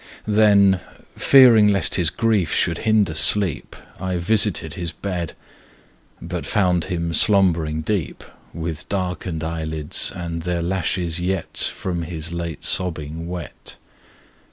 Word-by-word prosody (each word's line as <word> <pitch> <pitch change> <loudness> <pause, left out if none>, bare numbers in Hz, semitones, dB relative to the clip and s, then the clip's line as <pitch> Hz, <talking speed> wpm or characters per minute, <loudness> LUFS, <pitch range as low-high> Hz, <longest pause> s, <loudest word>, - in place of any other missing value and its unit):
Then, 100 -3 +4 0.4
fearing 120 -6 +6
lest 100 -2 +1
his 85 -3 +2
grief 105 -8 0
should 85 - 0
hinder 105 -6 +3
sleep 85 -3 +2 0.2
I 95 0 -2
visited 95 -3 +1
his 85 -4 -4
bed, 85 -1 -5 0.8
But 85 0 -5
found 90 -5 +1
him 85 -3 -3
slumbering 85 -6 +3
deep, 95 +1 -3 0.3
With 80 +1 -6
darkened 90 -4 -3
eyelids, 80 -2 -2
and 85 -2 -5
their 85 0 -2
lashes 85 -1 -1
yet. 95 -1 -3 0.2
From 90 -2 -4
his 85 -1 -5
late 85 -2 -5
sobbing 80 -2 -1
wet. 90 -2 -8
90 Hz, 120 wpm, -21 LUFS, 80-95 Hz, 0.8 s, fearing